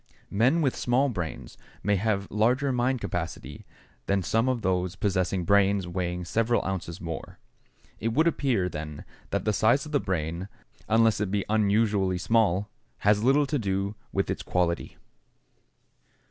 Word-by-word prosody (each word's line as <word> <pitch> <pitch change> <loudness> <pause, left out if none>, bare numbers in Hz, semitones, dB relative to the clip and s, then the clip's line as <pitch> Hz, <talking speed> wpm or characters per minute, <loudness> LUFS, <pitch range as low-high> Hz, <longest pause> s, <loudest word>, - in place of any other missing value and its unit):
Men 125 +11 +3
with 135 - +1
small 130 +3 +2
brains 85 -9 -6 0.2
may 105 0 +2
have 100 0 0
larger 125 +7 +2
mind 125 +1 +1
capacity 85 -5 -5 0.4
than 100 -1 +1
some 115 +7 +1
of 125 -3 -1
those 90 -1 0
possessing 95 -2 0
brains 100 -1 +3
weighing 90 0 -3
several 115 +5 +1
ounces 90 -2 -4
more. 85 -4 -6 0.6
It 110 - -2
would 135 +8 +2
appear, 130 - +1
then, 75 -3 -6 0.2
that - - -2
the 105 - +2
size 120 +8 +3
of 150 - -9
the 145 - +2
brain, 85 0 -3 0.4
unless 110 -1 +4
it 105 - 0
be 100 0 -1
unusually 105 -3 +2
small, 100 0 +2 0.3
has 105 +1 +3
little 140 +4 +4
to 145 0 -1
do 100 -1 -1 0.2
with 95 - 0
its - - -3
quality. 85 -1 -1
100 Hz, 150 wpm, -27 LUFS, 90-115 Hz, 0.6 s, unless